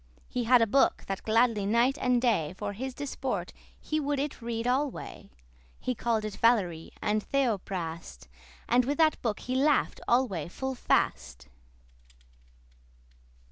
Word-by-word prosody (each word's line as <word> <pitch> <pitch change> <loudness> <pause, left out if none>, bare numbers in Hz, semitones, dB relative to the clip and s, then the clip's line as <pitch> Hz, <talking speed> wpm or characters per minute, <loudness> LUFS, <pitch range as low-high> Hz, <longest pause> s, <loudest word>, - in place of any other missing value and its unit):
He 245 -1 -2
had 245 0 +6
a - - +4
book, 270 +6 +2
that 195 0 -4
gladly 225 -1 +2
night 235 +5 +3
and 250 -1 +3
day 205 -10 +1
For 205 -1 -4
his 255 +5 -5
disport 260 -9 -4 0.3
he 310 - -2
would 290 -1 -1
it 280 -2 -3
read 230 0 -3
alway; 265 +2 -2 0.5
He 255 - -2
call'd 230 -2 -1
it 210 -2 -5
Valerie,<28> 185 -9 +1
and 215 0 +1
Theophrast, 180 - -3 0.4
And 245 +1 +3
with 285 +2 -1
that 315 -2 +3
book 220 -4 -2
he 255 - -4
laugh'd 280 +2 +2
alway 230 - +1
full 265 +9 -4
fast. 65 - -1
235 Hz, 140 wpm, -29 LUFS, 200-260 Hz, 0.5 s, had